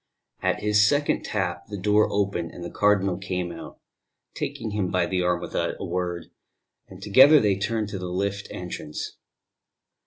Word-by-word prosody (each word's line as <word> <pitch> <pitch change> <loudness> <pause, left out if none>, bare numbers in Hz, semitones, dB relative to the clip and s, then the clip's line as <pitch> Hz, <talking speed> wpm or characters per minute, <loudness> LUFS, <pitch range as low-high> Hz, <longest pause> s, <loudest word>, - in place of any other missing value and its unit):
At - - 0
his 105 +1 +4
second 145 0 +1
tap - - -3
the 100 - -6
door 105 +3 +3
opened 100 -4 -1
and 90 - -8
the 85 - -6
Cardinal 100 -3 +2
came 90 -3 -3
out, 85 - -10 0.5
taking 130 -6 -4
him 100 -3 -1
by 90 -1 +1
the 90 0 -1
arm 90 -1 +1
without - - -2
a - - -4
word; 90 -1 -3 0.6
and - - -12
together 135 +9 +7
they 105 -4 +2
turned 105 +1 -2
to 100 - -5
the 90 -1 -5
lift 100 +2 -2
entrance. 85 -4 -6
100 Hz, 165 wpm, -25 LUFS, 90-105 Hz, 0.6 s, together